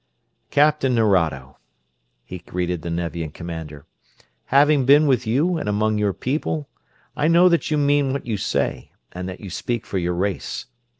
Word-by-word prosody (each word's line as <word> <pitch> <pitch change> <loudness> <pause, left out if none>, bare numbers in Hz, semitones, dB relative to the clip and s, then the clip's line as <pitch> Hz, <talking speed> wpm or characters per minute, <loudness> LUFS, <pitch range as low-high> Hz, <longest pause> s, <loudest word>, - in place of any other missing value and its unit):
"Captain 145 -3 +3
Nerado." 80 - +1 0.7
he 90 - -8
greeted 90 0 -3
the 85 - -5
Nevian 85 -1 -3
commander. 80 -3 -8 0.6
"Having 140 0 +4
been 145 +2 +6
with 130 -6 +1
you 160 +9 +1
and 105 - -3
among 105 +1 +1
your 105 -1 +1
people, 145 - -3 0.5
I 150 +1 +1
know 170 +2 +6
that 170 -2 +1
you 155 - +1
mean 145 -1 +2
what 140 - -4
you 115 -3 -2
say - - -2 0.2
and 90 +1 -6
that 95 - -9
you 100 -3 -8
speak 120 +5 -3
for 95 - -2
your 90 0 -1
race. 95 +1 -3
110 Hz, 165 wpm, -22 LUFS, 90-145 Hz, 0.7 s, been